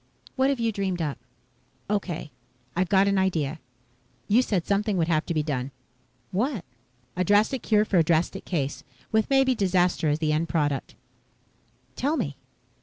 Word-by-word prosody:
What 265 Hz, 0 st, +3 dB
have 275 Hz, -3 st, 0 dB
you 230 Hz, -1 st, +1 dB
dreamed 195 Hz, -3 st, -2 dB
up?" 150 Hz, -4 st, -2 dB, 0.7 s
"Okay. 180 Hz, -7 st, -2 dB, 0.4 s
I've 180 Hz, 0 st, +1 dB
got 195 Hz, +1 st, +4 dB
an 200 Hz, -1 st, +2 dB
idea. 160 Hz, -5 st, 0 dB, 0.7 s
You 225 Hz, +5 st, +5 dB
said 195 Hz, -9 st, -1 dB
something 200 Hz, 0 st, +1 dB
would 165 Hz, -2 st, +1 dB
have 155 Hz, -1 st, +1 dB
to 170 Hz, -, -1 dB
be 155 Hz, -, +1 dB
done." 135 Hz, -4 st, -2 dB, 0.6 s
"What?" 220 Hz, -, -1 dB, 0.5 s
"A 180 Hz, -, +1 dB
drastic 210 Hz, +7 st, +3 dB
cure 210 Hz, -1 st, +3 dB
for 190 Hz, -4 st, +2 dB
a -, -, +5 dB
drastic 170 Hz, +4 st, +1 dB
case. 145 Hz, -6 st, -2 dB, 0.3 s
With 220 Hz, 0 st, +2 dB
maybe 270 Hz, -1 st, +4 dB
disaster 180 Hz, -6 st, +2 dB
as 150 Hz, -, +2 dB
the 155 Hz, -1 st, 0 dB
end 160 Hz, +2 st, 0 dB
product." 145 Hz, -4 st, -1 dB, 1.0 s
"Tell 295 Hz, +4 st, 0 dB
me." 140 Hz, -, -2 dB
185 Hz, 165 wpm, -26 LUFS, 160-210 Hz, 1.0 s, You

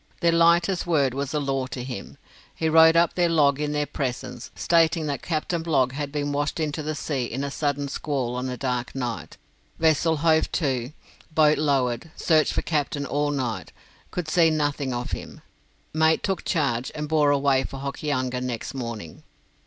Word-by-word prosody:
Their 170 Hz, -1 st, +4 dB
lightest 170 Hz, +2 st, +3 dB
word 140 Hz, -7 st, +2 dB
was 140 Hz, +1 st, -3 dB
a 150 Hz, -, 0 dB
law 135 Hz, -2 st, -1 dB
to 125 Hz, -1 st, -6 dB
him. 125 Hz, -6 st, -7 dB, 0.4 s
He 160 Hz, -, -1 dB
wrote 160 Hz, +1 st, +7 dB
up 170 Hz, 0 st, +4 dB
the 175 Hz, -1 st, +2 dB
log 145 Hz, -4 st, +3 dB
in 150 Hz, 0 st, -1 dB
their 150 Hz, 0 st, 0 dB
presence, 130 Hz, -3 st, -4 dB
stating 165 Hz, -1 st, +2 dB
that 145 Hz, -2 st, -3 dB
Captain 165 Hz, +1 st, -2 dB
Blogg 145 Hz, -6 st, +2 dB
had 140 Hz, +1 st, -4 dB
been 145 Hz, -1 st, -2 dB
washed 145 Hz, +2 st, -1 dB
into 155 Hz, 0 st, -2 dB
the 155 Hz, +1 st, -3 dB
sea 140 Hz, -5 st, -2 dB
in 130 Hz, +4 st, -4 dB
a 140 Hz, -, -3 dB
sudden 145 Hz, -1 st, -1 dB
squall 135 Hz, -3 st, -2 dB
on 125 Hz, +1 st, -3 dB
a 125 Hz, -, -4 dB
dark 125 Hz, -2 st, -2 dB
night; 115 Hz, -11 st, -4 dB, 0.4 s
vessel 160 Hz, 0 st, +3 dB
hove 160 Hz, +1 st, +2 dB
to, 130 Hz, -5 st, -1 dB, 0.4 s
boat 155 Hz, -1 st, +4 dB
lowered, 135 Hz, -2 st, 0 dB
searched 155 Hz, -2 st, +2 dB
for -, -, -1 dB
captain 145 Hz, -2 st, -1 dB
all 145 Hz, +1 st, 0 dB
night, 130 Hz, -6 st, -3 dB, 0.4 s
could 180 Hz, -3 st, -4 dB
see 165 Hz, +1 st, +4 dB
nothing 145 Hz, -3 st, -1 dB
of 120 Hz, 0 st, -4 dB
him; -, -, -6 dB, 0.5 s
mate 160 Hz, +1 st, +3 dB
took 190 Hz, -2 st, -1 dB
charge, 135 Hz, -8 st, 0 dB
and 150 Hz, 0 st, -3 dB
bore 150 Hz, -1 st, +3 dB
away 140 Hz, -2 st, +3 dB
for 135 Hz, -, -7 dB
Hokianga 130 Hz, -3 st, -2 dB
next 125 Hz, -3 st, -4 dB
morning. 115 Hz, -10 st, -6 dB
145 Hz, 180 wpm, -25 LUFS, 130-160 Hz, 0.5 s, wrote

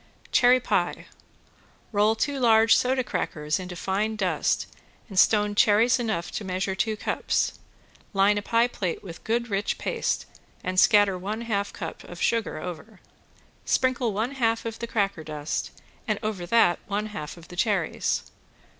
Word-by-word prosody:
~CHERRY 250 Hz, +1 st, +5 dB
PIE~ -, -, -1 dB, 0.9 s
Roll 210 Hz, +1 st, +3 dB
two 280 Hz, +4 st, -1 dB
large 225 Hz, -2 st, +5 dB
soda 255 Hz, +2 st, +1 dB
crackers 150 Hz, -7 st, -2 dB
into 180 Hz, -1 st, -7 dB
fine 205 Hz, +5 st, -1 dB
dust 190 Hz, -4 st, 0 dB, 0.4 s
and 195 Hz, -5 st, 0 dB
stone 210 Hz, 0 st, +4 dB
cherries 220 Hz, +4 st, +4 dB
enough 220 Hz, -8 st, -2 dB
to -, -, -4 dB
measure 190 Hz, 0 st, -2 dB
two 215 Hz, +3 st, -1 dB
cups. -, -, -1 dB, 0.5 s
Line 200 Hz, +1 st, +4 dB
a -, -, -6 dB
pie 230 Hz, +3 st, +2 dB
plate 190 Hz, -8 st, -4 dB
with 170 Hz, -4 st, -10 dB
good 235 Hz, +1 st, -1 dB
rich 200 Hz, +1 st, -1 dB
paste -, -, -1 dB, 0.4 s
and 185 Hz, 0 st, +1 dB
scatter 205 Hz, -3 st, +5 dB
one 210 Hz, +5 st, -4 dB
half 200 Hz, -3 st, -1 dB
cup 165 Hz, -4 st, -7 dB
of 175 Hz, -, -10 dB
sugar 230 Hz, -2 st, 0 dB
over. 180 Hz, +5 st, -8 dB, 0.6 s
Sprinkle 255 Hz, -3 st, +1 dB
one 220 Hz, +6 st, -1 dB
half 230 Hz, -4 st, 0 dB
of 225 Hz, -1 st, -5 dB
the 235 Hz, -, -4 dB
cracker 200 Hz, -7 st, -1 dB
dust, 150 Hz, -1 st, -3 dB, 0.4 s
and 215 Hz, -2 st, +1 dB
over 200 Hz, -5 st, -3 dB
that 190 Hz, -4 st, +4 dB
one 205 Hz, +1 st, -1 dB
half 155 Hz, -3 st, -6 dB
of 170 Hz, 0 st, -14 dB
the 175 Hz, -, -9 dB
cherries. 190 Hz, -4 st, 0 dB
210 Hz, 155 wpm, -26 LUFS, 185-230 Hz, 0.9 s, ~CHERRY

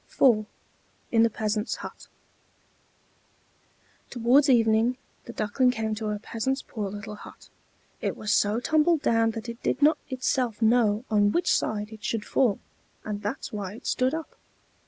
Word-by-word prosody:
IV 215 Hz, -5 st, +5 dB, 0.6 s
IN 225 Hz, -, +4 dB
THE 230 Hz, -, +5 dB
PEASANT'S 215 Hz, +1 st, -2 dB
HUT -, -, -10 dB, 2.0 s
Towards 255 Hz, +4 st, +3 dB
evening 230 Hz, 0 st, +3 dB, 0.3 s
the 235 Hz, -, -7 dB
Duckling 220 Hz, +5 st, +1 dB
came 220 Hz, -3 st, -1 dB
to 215 Hz, 0 st, -3 dB
a 210 Hz, -, -2 dB
peasant's 230 Hz, +5 st, -3 dB
poor 210 Hz, -4 st, -5 dB
little 205 Hz, +2 st, -7 dB
hut: 210 Hz, -, -13 dB, 0.5 s
it -, -, -2 dB
was 210 Hz, -1 st, -2 dB
so 210 Hz, +2 st, +2 dB
tumbled 310 Hz, +4 st, +2 dB
down 225 Hz, 0 st, +3 dB
that 225 Hz, -, -6 dB
it 235 Hz, 0 st, -7 dB
did -, -, -1 dB
not 300 Hz, +1 st, +5 dB
itself 255 Hz, -3 st, -1 dB
know 225 Hz, -1 st, +3 dB
on 205 Hz, -1 st, +4 dB
which 345 Hz, -, +2 dB
side 210 Hz, 0 st, -2 dB
it 215 Hz, -1 st, -12 dB
should 220 Hz, -2 st, -2 dB
fall; 235 Hz, -7 st, +2 dB, 0.5 s
and 205 Hz, -1 st, -4 dB
that's 210 Hz, +5 st, -5 dB
why 205 Hz, -1 st, -5 dB
it -, -, -14 dB
stood 255 Hz, +4 st, +1 dB
up. 320 Hz, -1 st, -7 dB
225 Hz, 155 wpm, -26 LUFS, 210-255 Hz, 2.0 s, IV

